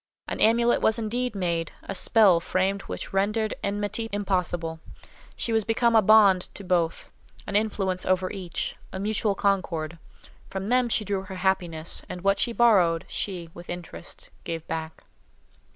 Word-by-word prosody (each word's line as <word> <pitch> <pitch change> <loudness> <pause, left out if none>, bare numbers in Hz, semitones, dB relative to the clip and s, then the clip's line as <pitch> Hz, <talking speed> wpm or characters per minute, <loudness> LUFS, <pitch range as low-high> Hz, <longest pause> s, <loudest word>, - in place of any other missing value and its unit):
An - - -4
amulet 235 +2 +3
was 220 - +3
indeed 235 +1 -2
made, 170 -3 -1
a - - -5
spell 195 -2 +5
framed 190 +3 0
which - - -6
rendered 210 +3 +1
enmity 205 +2 -2
impossible. 180 -5 -1 0.6
She 230 - -2
was 220 -1 +2
become 230 +2 +2
a 220 - +7
bond 200 -3 +5
to 200 - -7
both, 175 -3 -1 0.3
an - - -5
influence 195 -3 0
over 185 0 +1
each, 185 -5 -4 0.2
a 190 - -5
mutual 210 0 0
concord. 170 -5 -1 0.5
From 195 +1 -4
them 250 -1 +3
she 215 -1 0
drew 200 -1 -1
her 190 0 -8
happiness, 180 -4 0
and 180 - -6
what 195 +1 +2
she 240 - +1
borrowed, 190 -9 +3
she, 175 -4 -4
with 175 0 -12
interest, 175 - -9
gave 165 -1 -5
back. 160 0 -5
195 Hz, 155 wpm, -26 LUFS, 175-215 Hz, 0.6 s, a